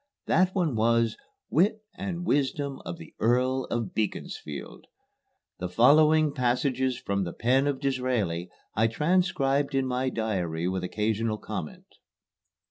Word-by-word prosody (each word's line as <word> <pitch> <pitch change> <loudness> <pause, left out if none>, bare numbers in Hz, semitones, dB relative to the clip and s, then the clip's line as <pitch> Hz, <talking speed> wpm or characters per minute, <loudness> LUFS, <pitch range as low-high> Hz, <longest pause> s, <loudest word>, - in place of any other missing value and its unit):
That 185 +1 +2
one 170 -9 +1
was, 115 0 +2 0.4
"Wit 210 +6 +2
and 180 -2 -4
Wisdom 140 -2 0
of 85 - -5
the 80 - -12
Earl 125 +3 +2
of 115 -5 -3
Beaconsfield." 85 -8 -4 0.7
The 90 - -3
following 150 - +5
passages 130 0 0
from 100 -3 -1
the 85 - -4
pen 130 +4 +2
of 140 -2 -1
Disraeli 125 - -1 0.2
I 110 +2 +3
transcribed 145 -1 +1
in 135 -1 +2
my 130 0 0
diary 90 -8 -2
with 95 0 -2
occasional 110 +3 -1
comment. - - -6
125 Hz, 130 wpm, -27 LUFS, 110-145 Hz, 0.7 s, following